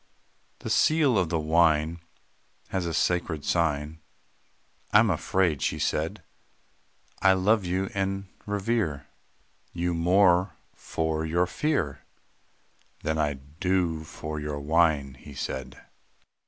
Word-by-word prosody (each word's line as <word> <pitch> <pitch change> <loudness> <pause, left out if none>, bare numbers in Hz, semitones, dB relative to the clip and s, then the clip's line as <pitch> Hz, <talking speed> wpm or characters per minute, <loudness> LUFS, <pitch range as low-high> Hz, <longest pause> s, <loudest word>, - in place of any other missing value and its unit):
"The - - -5
seal 155 -5 +4
of 90 -5 +2
the 85 - 0
wine 80 0 +2 0.7
Has 95 -3 -2
a 85 - -3
sacred 85 -3 0
sign; 80 -2 0 0.9
I - - +7
am 110 -1 +5
afraid," 85 -3 +1
she - - 0
said. - - -1 1.0
"I 95 - +6
love 100 +2 +2
and 95 +1 -2 0.2
revere 100 -8 -1 0.7
You 90 0 -1
more 90 0 +3 0.2
for 80 -1 -2
your 85 +3 +1
fear, 85 - -1 1.0
Than 80 +1 -1
I 75 -1 +1
do 80 +4 -1
for 75 0 -6
your 75 -1 -4
wine," 75 -2 +2
he 75 -1 -12
said. 65 0 -5
85 Hz, 115 wpm, -27 LUFS, 75-95 Hz, 1.0 s, I